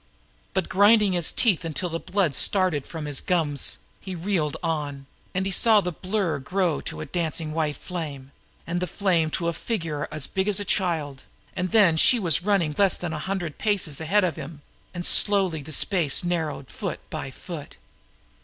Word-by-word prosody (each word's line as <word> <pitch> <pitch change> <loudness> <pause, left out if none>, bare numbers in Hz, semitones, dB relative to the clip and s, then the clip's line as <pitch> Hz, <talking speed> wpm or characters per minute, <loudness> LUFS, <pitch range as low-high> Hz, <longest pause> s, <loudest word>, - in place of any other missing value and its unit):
But 190 -2 0
grinding 205 +1 +5
his 175 -2 0
teeth 210 -10 +2
until 165 +2 -3
the 165 0 -3
blood 185 -6 0
started 185 -4 +2
from 160 -2 -6
his 145 -2 -2
gums, 155 -6 +1 0.2
he 190 -2 -7
reeled 170 -4 -1
on, 145 -4 -3 0.3
and 190 +1 0
he 195 - -1
saw 220 +3 +5
the 180 -2 -2
blur 185 -3 -2
grow 180 +3 0
to - - -5
a - - -4
dancing 165 -2 -3
white 155 -2 -1
flame, 145 -7 -6 0.3
and 175 +1 -2
the 180 - -2
flame 175 -6 +1
to 170 - -2
a 170 - 0
figure 165 -9 -3 0.3
big 190 +1 0
as 205 -2 +3
a 205 - -3
child; 160 -10 -1 0.3
and 185 0 -1
then 200 -7 +5
she 245 - +6
was 170 -6 +2
running 185 -6 +1
less 200 -2 +4
than 175 -2 -4
a 155 - -3
hundred 180 -3 -4
paces 185 -9 0
ahead 195 +6 +2
of 175 -5 -1
him, 145 0 -8 0.3
and 175 -1 -5
slowly 190 -6 +4
the 140 - -10
space 165 -2 +2
narrowed, 165 -6 -2
foot - - -6
by 135 - -4
foot. 150 +2 -9
175 Hz, 180 wpm, -25 LUFS, 155-190 Hz, 0.3 s, she